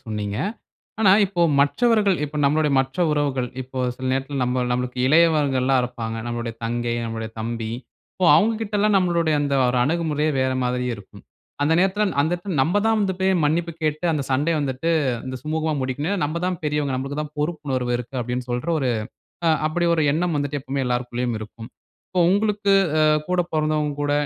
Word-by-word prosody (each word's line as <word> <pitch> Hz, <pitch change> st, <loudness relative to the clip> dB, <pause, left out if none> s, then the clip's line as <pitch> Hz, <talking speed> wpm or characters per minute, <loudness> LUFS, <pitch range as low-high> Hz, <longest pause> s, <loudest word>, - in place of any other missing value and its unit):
சொன்னீங்க. 105 Hz, -1 st, -3 dB, 0.6 s
ஆனா 200 Hz, -4 st, +6 dB
இப்போ 185 Hz, -3 st, -3 dB, 0.2 s
மற்றவர்கள் 210 Hz, +4 st, +3 dB
இப்ப 150 Hz, +1 st, -6 dB
நம்முளுடைய 150 Hz, +1 st, +2 dB
மற்ற 135 Hz, +5 st, -1 dB
உறவுகள் 140 Hz, -4 st, 0 dB
இப்போ 130 Hz, +1 st, -8 dB, 0.2 s
சில 130 Hz, -, -5 dB
நேரத்தில 135 Hz, +1 st, -2 dB
நம்ம 125 Hz, +1 st, 0 dB
நமக்கு 125 Hz, 0 st, -2 dB
இளையவர்கள்லாம் 140 Hz, -5 st, +3 dB
இருப்பாங்க. 115 Hz, -2 st, -4 dB
நம்முடைய 120 Hz, -1 st, -4 dB
தங்கை, 120 Hz, 0 st, -1 dB
நம்முடைய 115 Hz, -1 st, -5 dB
தம்பி 115 Hz, 0 st, -3 dB, 0.5 s
இப்போ 185 Hz, -, +1 dB
அவங்ககிட்டலாம் 210 Hz, -1 st, +2 dB
நம்முளுடைய 170 Hz, -4 st, +2 dB
அந்த 140 Hz, -1 st, 0 dB
ஒரு 125 Hz, -, 0 dB
அணுகுமுறையே 155 Hz, -1 st, 0 dB
வேற 130 Hz, 0 st, +1 dB
மாதிரி 125 Hz, 0 st, -1 dB
இருக்கும். 100 Hz, -, -14 dB, 0.4 s
அந்த 155 Hz, +3 st, +2 dB
நேரத்துல 195 Hz, +3 st, +2 dB, 0.2 s
அந்த 155 Hz, +4 st, +1 dB
நேத்துல 175 Hz, -2 st, -4 dB
நம்ப 175 Hz, +8 st, +1 dB
தான் 225 Hz, 0 st, +3 dB
வந்து 190 Hz, -2 st, 0 dB
போய் 190 Hz, 0 st, +3 dB
மன்னிப்பு 165 Hz, +3 st, 0 dB
கேட்டு 155 Hz, +2 st, -1 dB
அந்த 145 Hz, -3 st, -1 dB
சண்டை 145 Hz, +6 st, +1 dB
வந்துட்டு 140 Hz, +4 st, -1 dB, 0.4 s
இந்த 130 Hz, 0 st, -4 dB
சுமூகமா 155 Hz, 0 st, -1 dB
முடிக்கனும். 145 Hz, +10 st, -2 dB
நம்ப 160 Hz, +3 st, -2 dB
தான் 180 Hz, -1 st, -1 dB
பெரியவங்க. 150 Hz, -3 st, 0 dB
நமளுக்கு 140 Hz, +3 st, -3 dB
தான் 150 Hz, 0 st, -8 dB
பொறுப்புணர்வு 145 Hz, -6 st, -2 dB
இருக்கு. 125 Hz, +2 st, -8 dB
அப்பிடின்னு 125 Hz, +1 st, -4 dB
சொல்ற 120 Hz, +6 st, -2 dB
1 130 Hz, -3 st, 0 dB, 0.6 s
அ -, -, +5 dB, 0.2 s
அப்பிடி 170 Hz, +2 st, 0 dB
1 160 Hz, -, +1 dB
எண்ணம் 170 Hz, +1 st, 0 dB
வந்துட்டு 145 Hz, 0 st, -2 dB
எப்பமே 135 Hz, +1 st, -3 dB
எல்லாருக்குள்ளேயும் 120 Hz, -1 st, -2 dB
இருக்கும். 110 Hz, +2 st, -9 dB, 0.4 s
இப்போ 185 Hz, -, 0 dB
உங்களுக்கு 205 Hz, 0 st, +2 dB, 0.3 s
அ -, -, +4 dB, 0.3 s
கூட 180 Hz, -1 st, +2 dB
பொறந்தவங்க 155 Hz, -1 st, 0 dB
கூட 145 Hz, 0 st, 0 dB
145 Hz, 170 wpm, -22 LUFS, 125-170 Hz, 0.6 s, ஆனா